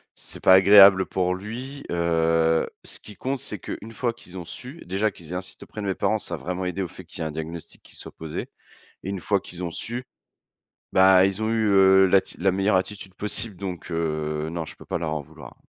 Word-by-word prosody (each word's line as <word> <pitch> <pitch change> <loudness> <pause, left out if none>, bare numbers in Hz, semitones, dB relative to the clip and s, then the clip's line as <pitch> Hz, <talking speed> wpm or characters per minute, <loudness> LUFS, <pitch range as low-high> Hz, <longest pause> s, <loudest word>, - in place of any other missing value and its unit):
c'est - - -9
pas 95 - +7
agréable 95 0 +8
pour 90 -1 0
lui, 125 +8 -7
heu, 80 -1 +2
ce - - -9
qui 105 - -13
compte 130 +5 -3
c'est 105 - -5
qu'une 110 +5 -7
fois 120 0 -1
qu'ils 95 -5 -13
ont 90 - -6
su 130 - -10
déjà 95 +4 0
qu'ils 85 -1 -14
aient 90 - -3
insisté 90 - -7
auprès 105 - -8
de 100 - -3
mes 95 - 0
parents, 110 +2 +1
ça 90 -3 -3
a - - -7
vraiment 90 +3 -4
aidé 90 +2 -2
au - - -3
fait - - -12
qu'il - - -13
y - - -3
ait - - -1
un - - -5
diagnostic 80 +2 -7
qui - - -15
soit - - -9
posé, 80 -1 -6 0.6
et 95 - -4
une 100 -1 -3
fois 100 +2 +1
qu'ils 90 -1 -8
ont 85 - -3
su, 120 +8 -5 0.9
bah 95 0 +6
ils 100 +2 -3
ont 110 - 0
eu, 110 -1 +1
heu, 95 -1 +6
l'atti 95 +1 +2
la 95 +1 +2
meilleure 95 +2 +2
attitude 95 0 -3
possible, 105 +1 -4
donc, 90 -2 -6
heu, 75 -2 -2
non 85 0 -3
je - - -11
peux - - -14
pas - - -2
leur 80 -2 -3
en 75 - -2
vouloir. - - -13
95 Hz, 235 wpm, -24 LUFS, 85-105 Hz, 0.9 s, agréable